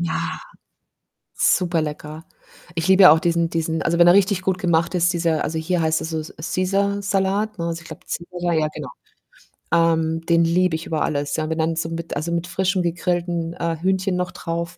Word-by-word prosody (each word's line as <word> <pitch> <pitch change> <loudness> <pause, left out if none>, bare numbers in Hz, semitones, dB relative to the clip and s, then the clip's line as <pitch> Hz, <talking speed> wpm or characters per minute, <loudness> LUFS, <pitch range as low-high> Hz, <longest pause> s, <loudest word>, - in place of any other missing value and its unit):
Ja, 170 -2 -2 1.0
super 175 -2 +2
lecker. 155 +1 -6 0.5
Ich 165 +1 -2
liebe 190 0 +7
ja 155 - +10
auch 160 - +3
diesen 170 -1 +1
diesen 165 -1 -2
also, 170 +1 0
wenn 170 - +7
er 175 - +8
richtig 195 -1 +3
gut 185 -1 0
gemacht 170 -1 +1
ist, 175 +1 +2
dieser 165 -2 0
also, 160 - -3
hier 170 +2 -1
heißt 160 0 +1
er - - -4 0.2
so 155 - -11
Caesar-Salat, 195 +3 -1
ne? 170 - -2
Also, 170 0 -4
ich - - -14
glaube, - - -10 0.3
Caesar. 175 -1 -2
Ja, 155 -1 +2
genau. - - -6 0.9
Ähm, 165 -1 +2
den 170 0 +4
liebe 175 0 +2
ich 160 - -5
über 155 -2 -2
alles, 145 -1 -1
ja. 155 0 -2
Wenn 160 - -2
dann 160 +1 0
so 165 0 -2
mit 165 -1 -5
also, 155 +4 -3
mit 170 0 -1
frischem 185 +1 0
gegrillten, 170 -1 -2
äh, 170 -1 -2
Hühnchen 190 0 0
noch 180 0 -2
drauf. 170 +1 -5
170 Hz, 200 wpm, -21 LUFS, 160-180 Hz, 1.0 s, ja